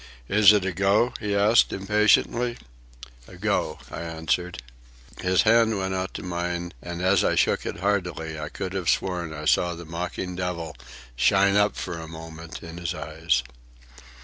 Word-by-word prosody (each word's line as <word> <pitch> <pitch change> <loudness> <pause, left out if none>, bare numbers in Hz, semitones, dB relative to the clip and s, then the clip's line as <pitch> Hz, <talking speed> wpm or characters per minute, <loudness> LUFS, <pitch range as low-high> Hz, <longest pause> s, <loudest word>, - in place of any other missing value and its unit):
"Is 105 0 +7
it 105 -3 +2
a 95 - 0
go?" 100 +6 +2
he 105 -2 -2
asked 105 +3 +4
impatiently. 105 +4 +2 0.7
"A - - -13
go," 75 - -1
I - - -5
answered. 80 -2 -2 0.6
His 90 0 +3
hand 115 -1 +4
went 95 0 -2
out 95 0 -3
to - - -5
mine, 85 -1 -3
and 85 0 -5
as 95 0 +4
I - - +2
shook - - +1
it - - -5
heartily 90 -6 -1
I 75 - -5
could 95 0 -5
have 95 -3 -1
sworn 90 -4 0
I 75 -1 -7
saw 85 +2 +2
the 85 +1 -9
mocking 90 +2 -4
devil 85 -4 -4 0.4
shine 100 +9 +4
up 105 0 +3
for 85 - -5
a 80 - -8
moment 80 0 -9
in 85 +1 -8
his 85 0 -3
eyes. 80 -5 -1
90 Hz, 170 wpm, -25 LUFS, 80-100 Hz, 0.7 s, Is